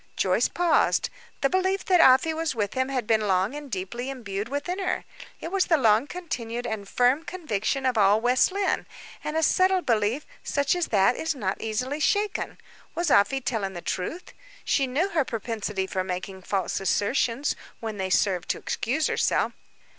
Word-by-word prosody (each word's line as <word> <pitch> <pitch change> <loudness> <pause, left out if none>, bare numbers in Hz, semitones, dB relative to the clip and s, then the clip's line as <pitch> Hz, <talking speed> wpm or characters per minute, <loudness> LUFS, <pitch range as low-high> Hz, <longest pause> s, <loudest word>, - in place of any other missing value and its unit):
Joyce - - +2
paused. 350 -2 +2 0.3
The 275 - +3
belief 375 +1 +1
that 365 -2 +4
Afy 265 +4 +6
was 320 -3 -2
with 205 -3 -1
him 260 +1 0
had 255 -4 -1
been 215 -1 +2
long 190 +4 +1
and 295 -1 -7
deeply 230 +5 -4
imbued 215 -5 -5
within 320 +7 -3
her; 380 - -2 0.3
it 330 - -6
was 390 -1 +1
the 325 - +4
long 225 0 +3
continued 245 -9 -5
and 210 -4 -4
firm 250 +4 +3
conviction 275 - -2
of 250 -3 +2
all 205 +1 +5
West 250 +8 +3
Lynne, 395 0 -1 0.4
and 305 +1 -2
a 320 - +1
settled 370 +3 +3
belief, 230 +4 +1 0.2
such 285 +2 0
as 350 -2 -1
that, 205 +3 +3
is 320 -1 -2
not 195 -7 -3
easily 250 +7 -2
shaken. 410 +6 0 0.4
Was 340 -2 0
Afy 270 +7 +4
telling 215 -6 -2
the 175 - -6
truth? 315 - -4 0.3
She 275 -2 +2
knew 305 +10 0
her 325 -5 +1
propensity 215 -4 -3
for 190 -1 -2
making 185 +1 -5
false 190 -1 -1
assertions, 230 +7 0 0.2
when 220 -2 -5
they 190 -1 -2
served 185 -2 +1
to - - 0
excuse 260 +7 -1
herself. - - +1
250 Hz, 175 wpm, -26 LUFS, 210-315 Hz, 0.4 s, Afy